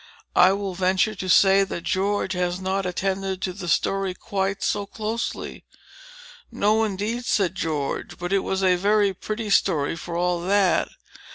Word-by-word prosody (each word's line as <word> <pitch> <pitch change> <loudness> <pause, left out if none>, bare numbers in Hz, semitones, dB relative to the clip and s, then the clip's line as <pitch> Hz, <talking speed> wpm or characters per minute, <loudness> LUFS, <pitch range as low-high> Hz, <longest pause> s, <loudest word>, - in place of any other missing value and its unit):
I 180 +1 +7
will 195 -1 -3
venture 190 +3 +1
to 185 -2 -6
say 195 +1 +6
that 170 -3 -5
George 195 +1 0
has 180 0 -1
not 190 0 -1
attended 190 +1 -2
to 185 - -2
the 185 -1 -7
story 195 +2 0
quite 195 -1 -2
so 205 -1 -1
closely." 220 +3 -4 0.9
"No 215 +2 +2
indeed," 215 +4 -2
said 195 -5 +1
George, 155 -7 -3
"but 175 +2 -3
it 195 - +4
was 190 0 -2
a 180 -1 +4
very 205 +1 +2
pretty 215 +3 -5
story 165 -7 +2
for 170 +1 -6
all 175 0 0
that. 195 +1 +2
190 Hz, 160 wpm, -24 LUFS, 180-200 Hz, 0.9 s, I